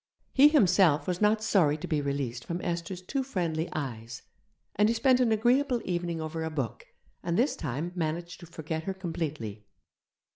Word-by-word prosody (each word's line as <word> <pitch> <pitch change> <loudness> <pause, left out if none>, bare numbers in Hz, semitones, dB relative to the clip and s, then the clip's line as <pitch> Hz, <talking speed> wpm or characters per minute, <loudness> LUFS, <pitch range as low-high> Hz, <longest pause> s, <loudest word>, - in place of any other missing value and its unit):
He 275 +2 +8
himself 180 - +4
was 180 +1 -2
not 215 +1 +3
sorry 165 -9 +3
to - - -6
be 155 -3 0
released 140 -4 -3
from 170 +1 -4
Esther's 175 +1 -3
too 270 +9 -2
friendly 175 -10 -2
eyes, 115 -6 -5 0.5
and 210 +2 +4
he 230 - +1
spent 255 +2 +4
an 245 -3 +3
agreeable 245 +4 +2
evening 175 -2 -2
over 160 +1 -4
a 160 - -2
book, 140 -8 -4 0.3
and 170 0 -1
this 255 +5 +2
time 150 +4 -4
managed 170 0 -3
to 170 - -11
forget 160 0 -5
her 195 - -3
completely. 150 - -5
170 Hz, 175 wpm, -28 LUFS, 155-210 Hz, 0.5 s, He